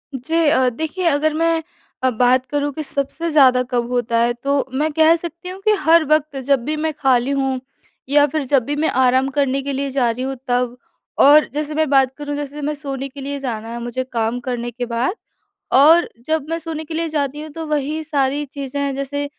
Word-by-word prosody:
जी 320 +5 0
अ, 260 -4 +3
देखिए 320 +8 -4
अगर 305 0 +2
मैं 330 0 +1 0.4
अ, 260 - +4
बात 250 +2 +2
करूँ 290 +1 -2
कि 310 - -4
सबसे 280 +4 -3
ज़्यादा 260 -4 +5
कब 240 -1 0
होता 240 -1 0
है 240 +1 +2
तो 280 0 +1
मैं 300 +3 0
कह 320 +1 +5
सकती 340 +2 -7
हूँ 375 +1 -8
कि 430 - +5
हर 330 0 +5
वक़्त 305 -1 +1
जब 275 -4 +3
भी 305 +1 -1
मैं 315 0 -1
खाली 265 -2 +1
हूँ 270 -2 0 0.5
या 290 0 +5
फिर 305 0 -2
जब 260 -2 +2
भी 290 +1 -2
मैं 315 +2 +1
आराम 260 +1 +3
करने 275 -1 +1
के 280 0 -4
लिए 275 +1 -2
जा 255 -3 +1
रही 250 +3 -5
हूँ 270 0 -3
तब 245 0 0 0.5
और 295 +2 +7
जैसे 300 0 -3
मैं 315 -2 +1
बात 265 -2 +3
करूँ 290 0 -4
जैसे 290 0 -5
मैं 300 +1 -1
सोने 275 -2 -4
के 275 +1 -10
लिए 280 +1 -4
जाना 230 -4 -4
है 235 - -5
मुझे 240 +2 -3
काम 230 +1 -1
करने 240 -1 -3
के 245 +1 -4
बाद। 240 - -1 0.6
और 320 +5 +6 0.2
जब 315 -2 -1
मैं 330 - -1
सोने 320 -1 -6
के 315 - -7
लिए 330 0 -1
जाती 295 -1 -2
हूँ 310 - -8
तो 325 0 -6
वही 300 +1 -1
सारी 285 -1 0
चीज़ें 280 0 -5
हैं, 280 -1 -1
जैसे 275 +1 -3
280 Hz, 220 wpm, -19 LUFS, 260-310 Hz, 0.6 s, और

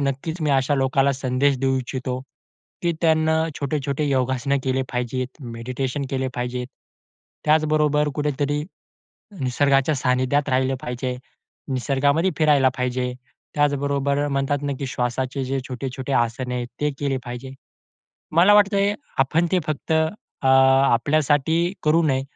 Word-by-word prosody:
नक्कीच 140 +5 -2
मी 150 - +1
अशा 135 +1 +2
लोकाला 135 +1 +2
संदेश 130 +1 +1
देऊ 135 0 +1
इच्छितो, 130 0 -4 0.6
की 170 -1 +1
त्यांनी 160 -1 +3 0.3
छोटे-छोटे 140 0 -1
योगासनं 130 +1 +1
केले 130 0 +1
पाहिजेत, 125 +1 -2
मेडिटेशन 125 +4 -4
केले 130 -1 -1
पाहिजेत. 125 0 -3 0.8
त्याचबरोबर 150 -1 +3
कुठेतरी 145 0 -1 0.8
निसर्गाच्या 135 +3 +2
सानिध्यात 130 +3 +1
राहिलं 130 +1 +1
पाहिजे. 125 +1 -3 0.6
निसर्गामध्ये 140 +7 +1
फिरायला 145 -4 +4
पाहिजे. 125 0 -1 0.4
त्याचबरोबर 140 0 +1
म्हणतात 140 +1 0
ना, 140 -1 -1
की 140 - -3
श्वासाचे 130 +2 -2
जे 135 +1 -2
छोटे-छोटे 130 +1 -5
आसन 125 +1 0
आहेत, 125 -1 -2
ते 150 0 +1
केले 140 -2 0
पाहिजे. 125 +2 -7 0.8
मला 195 +5 +7
वाटतंय 200 0 +3 0.2
आपण 160 +6 +2
ते 185 - +4
फक्त 155 +1 -3
अ, 160 -2 -2
आपल्यासाठी 140 +5 +3
करू 160 +2 +3
नये, 135 -2 +1
135 Hz, 125 wpm, -23 LUFS, 130-150 Hz, 0.8 s, मला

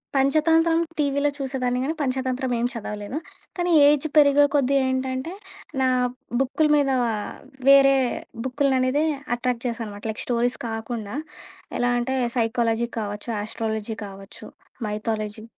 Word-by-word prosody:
పంచతంత్రం 320 +4 +3 0.2
టీవీలో 285 0 +2
చూసేదాన్ని 255 -3 -1
గానీ 310 +4 -1
పంచతంత్రం 260 -1 -1
ఏం 235 - +1
చదవలేదు. 210 +2 -5 0.4
కానీ 350 0 0 0.2
ఏజ్ 295 +1 +3
పెరిగే 290 -1 +6
కొద్దీ 275 -1 +3
ఏంటంటే 260 +4 -2 0.5
నా 260 - +3 0.5
బుక్కుల 270 +4 +1
మీద 280 -2 +2 0.8
వేరే 275 0 +7 0.5
బుక్కులననేదే 265 +2 +1 0.3
అట్రాక్ట్ 245 0 -2
చేసానుమాట. 225 -4 -5
లైక్ 215 - -5
స్టోరీస్ 245 0 0
కాకుండా 225 -1 -5 0.6
ఎలా 245 0 +2
అంటే 260 +2 -1 0.2
సైకాలజీ 230 0 +1
కావచ్చు, 205 +2 -5
ఆస్ట్రాలజీ 220 0 -3
కావచ్చు, 195 0 -10 0.4
మైథాలజీ 215 0 -3
255 Hz, 110 wpm, -24 LUFS, 225-275 Hz, 0.8 s, వేరే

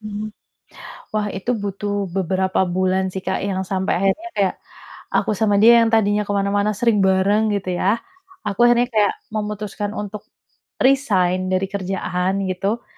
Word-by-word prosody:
Mhm. 215 0 -6 0.8
Wah 210 -1 0
itu 195 +6 -3
butuh 205 -1 -3
beberapa 190 0 0 0.2
bulan 185 0 +1
sih 190 - -5
Kak, - - -1
yang 190 -1 -2
sampai 190 0 -1
akhirnya 195 - 0
kayak 195 -2 +1 0.6
aku - - +2
sama 210 -2 +2
dia 235 +2 +8
yang 230 - +4
tadinya 210 -1 +3
ke - - -2
mana-mana 200 +1 +1
sering 225 0 +2
bareng 195 +3 +3
gitu, 195 -2 -3
ya, 200 +4 +3 0.5
aku 200 -1 -4
akhirnya 240 0 +3
kayak 210 -3 +2 0.2
memutuskan 210 -1 -4
untuk 210 0 -6 0.6
resign 190 -9 +2
dari 185 +1 0
kerjaan 190 0 -2
gitu. 195 +5 -2
200 Hz, 150 wpm, -21 LUFS, 190-215 Hz, 0.8 s, dia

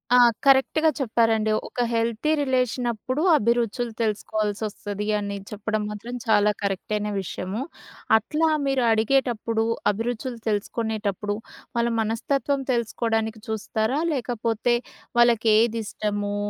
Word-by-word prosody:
ఆ! - - +7 0.3
కరెక్ట్‌గా 275 +4 +4
చెప్పారండి. 225 -3 +2 0.2
ఒక 245 - -3
హెల్తీ 230 +5 0
రిలేషన్ 255 -2 0
అప్పుడు 255 +5 -3 0.2
అభిరుచులు 235 +1 0
తెలుసుకోవాల్సి 215 -1 -1
వస్తది 205 0 -5
అని 200 -1 -3
చెప్పడం 215 +1 -2
మాత్రం 210 +3 -7
చాలా 210 -2 +4
కరెక్ట్ 200 +1 -2
అయిన 210 0 -1
విషయము. 190 +4 -4 0.6
అట్లా 305 +9 0 0.2
మీరు 270 -2 +1
అడిగేటప్పుడు 225 -1 +1 0.3
అభిరుచులు 235 +3 -4
తెలుసుకునేటప్పుడు 210 -1 -1 0.4
వాళ్ళ 235 0 +2
మనస్తత్వం 275 +5 0
తెలుసుకోవడానికి 225 -2 -1
చూస్తారా? 220 +4 -1
లేకపోతే 240 -2 0 0.5
వాళ్ళకి 235 -2 +4
ఏది 230 0 +2
ఇష్టము, 205 -1 -2
225 Hz, 110 wpm, -24 LUFS, 210-245 Hz, 0.6 s, ఆ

